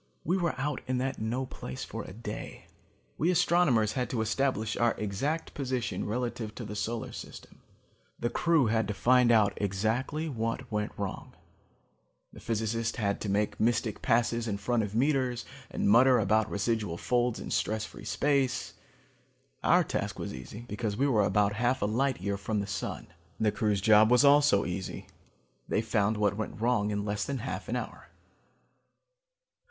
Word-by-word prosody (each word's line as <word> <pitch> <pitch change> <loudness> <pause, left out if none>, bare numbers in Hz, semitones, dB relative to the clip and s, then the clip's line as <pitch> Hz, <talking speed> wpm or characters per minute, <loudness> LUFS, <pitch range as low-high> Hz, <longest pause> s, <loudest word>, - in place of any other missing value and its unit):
"We 175 - +1
were 170 -7 -1
out 145 0 -2
in 130 0 0
that 130 +1 -2
no 120 +4 -1
place 65 - -7
for - - -6
a - - -9
day. 105 +1 -7 0.5
We 165 - +2
astronomers 170 - +3
had 125 -1 -2
to 115 - -1
establish 110 -1 0
our 120 -1 +2
exact 135 +11 -2
position 130 -3 -2
relative 115 -1 -3
to 120 - -6
the 105 0 -6
solar 115 +2 -3
system. - - -10 0.6
The 120 - -2
crew 165 -5 +3
had 110 -1 +1
to 105 - -3
find 125 +2 +4
out 110 -3 +4
exactly 110 - -1
what 115 -1 -3
went 105 0 -1
wrong. 100 -2 -5 1.0
The - - -11
physicists 115 0 -2
had 100 -2 -1
to 105 - -3
make 105 +2 0
mystic 115 -1 0
passes 120 -1 +1
in 100 -2 -1
front 115 +4 0
of 105 0 -4
meters 130 -2 +1 0.2
and - - -1
mutter 125 +5 +6
about 110 +1 +2
residual 105 -4 -1
folds 120 +3 0
in - - -7
stress 110 0 0
free - - -11
space. 140 -3 0 0.9
Our - - +5
task - - -3
was - - -5
easy, 65 - -8
because 105 -2 -3
we 135 - +2
were 115 -7 +3
about 100 0 +2
half 120 +4 +1
a - - +3
light 130 +6 0
year 100 +2 -2
from 105 +2 -2
the 100 - -2
sun. 95 -3 -4 0.3
The 110 -1 +2
crew's 105 -4 0
job 110 +1 +6
was 125 +3 +5
also 140 -7 +5
easy: 90 0 -5 0.6
they 110 - 0
found 110 -1 +1
what 100 -1 +2
went 110 -1 -4
wrong 115 -3 +1
in 105 -1 -2
less 100 -1 -1
than 140 - -3
half 125 +2 -5
an - - -1
hour. - - -6
115 Hz, 170 wpm, -29 LUFS, 105-125 Hz, 1.0 s, mutter